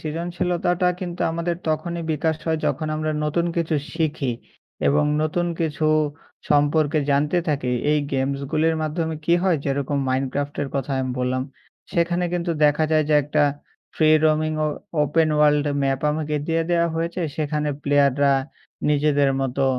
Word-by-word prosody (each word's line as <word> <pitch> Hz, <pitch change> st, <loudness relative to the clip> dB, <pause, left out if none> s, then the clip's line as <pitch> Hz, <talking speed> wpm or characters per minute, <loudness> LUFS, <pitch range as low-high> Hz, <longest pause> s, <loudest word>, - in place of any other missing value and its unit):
সৃজনশীলতাটা 175 Hz, +2 st, -1 dB
কিন্তু 175 Hz, -2 st, -5 dB
আমাদের 170 Hz, +1 st, -2 dB
তখনই 170 Hz, +2 st, -2 dB
বিকাশ 160 Hz, +1 st, 0 dB
হয়। 160 Hz, -1 st, +1 dB
যখন 155 Hz, -, -1 dB
আমরা 155 Hz, 0 st, -1 dB
নতুন 170 Hz, +3 st, 0 dB
কিছু 165 Hz, -1 st, 0 dB, 0.2 s
শিখি। 150 Hz, -6 st, -1 dB, 0.6 s
এবং 150 Hz, +1 st, +3 dB, 0.2 s
নতুন 175 Hz, +3 st, 0 dB
কিছু 155 Hz, -2 st, 0 dB, 0.6 s
সম্পর্কে 145 Hz, +1 st, +3 dB
জানতে 145 Hz, +5 st, +2 dB
থাকি। 140 Hz, -4 st, 0 dB, 0.2 s
এই 150 Hz, -, +3 dB
গেমসগুলির 140 Hz, +4 st, 0 dB
মাধ্যমে 160 Hz, +1 st, -2 dB
কী 170 Hz, -, +4 dB
হয়। 185 Hz, -4 st, +3 dB
যেরকম 140 Hz, 0 st, -1 dB
মাইনক্রাফটের 135 Hz, +2 st, -2 dB
কথা 135 Hz, 0 st, -2 dB
আমি 130 Hz, -1 st, -2 dB
বললাম। 130 Hz, +1 st, 0 dB, 0.5 s
সেখানে 175 Hz, +1 st, +1 dB
কিন্তু 175 Hz, -1 st, -1 dB
দেখা 150 Hz, +1 st, +3 dB
যায় 155 Hz, -1 st, +3 dB
যে 155 Hz, -, +3 dB
একটা 150 Hz, +2 st, +1 dB, 0.5 s
ফ্রি 155 Hz, -, +3 dB, 0.2 s
রোমিং 155 Hz, 0 st, +2 dB
ও -, -, +1 dB, 0.4 s
ওপেন 155 Hz, +2 st, +2 dB
ওয়ার্ল্ড 150 Hz, -1 st, +4 dB, 0.2 s
ম্যাপ 135 Hz, -1 st, 0 dB
আমাকে 150 Hz, 0 st, -2 dB
দিয়ে 165 Hz, 0 st, +1 dB
দেওয়া 170 Hz, -1 st, +2 dB
হয়েছে। 170 Hz, +2 st, -2 dB, 0.2 s
সেখানে 150 Hz, -1 st, -1 dB
প্লেয়াররা 140 Hz, -1 st, +3 dB, 0.6 s
নিজেদের 145 Hz, -1 st, +3 dB
মতো 135 Hz, +1 st, 0 dB
155 Hz, 145 wpm, -23 LUFS, 145-165 Hz, 0.6 s, কী